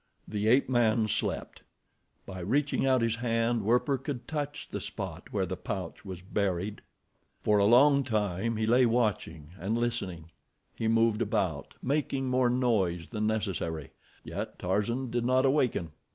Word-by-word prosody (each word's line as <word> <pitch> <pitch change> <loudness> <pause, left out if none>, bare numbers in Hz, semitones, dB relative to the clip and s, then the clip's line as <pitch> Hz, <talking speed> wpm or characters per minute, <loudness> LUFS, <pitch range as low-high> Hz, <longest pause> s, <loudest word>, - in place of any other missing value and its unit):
The 105 0 -2
ape 125 +5 +4
man 115 -3 +2
slept. - - -3 0.6
By 95 -1 -7
reaching 135 +9 +1
out 130 -3 +3
his 115 0 +1
hand 115 0 +1
Werper 125 +6 +2
could 135 -2 -5
touch 145 -1 -4
the - - -5
spot - - -6
where - - 0
the - - -4
pouch 90 -3 -5
was 95 -3 -8
buried. 100 0 -2 0.6
For 105 -1 +3
a 100 - +4
long 140 +4 +6
time 110 -2 -1
he 110 - 0
lay 120 +2 +5
watching 105 -10 -1
and 105 +6 -1
listening. 95 -9 -3 0.4
He 110 - -2
moved 115 0 +3
about, 100 -10 -1
making 135 -1 0
more 125 -1 +3
noise 105 -9 +1
than 105 -2 -1
necessary, 95 -8 -2 0.3
yet - - -5
Tarzan 115 +7 -1
did 120 0 0
not 130 +2 +3
awaken. 130 - +1
115 Hz, 150 wpm, -29 LUFS, 100-125 Hz, 0.6 s, long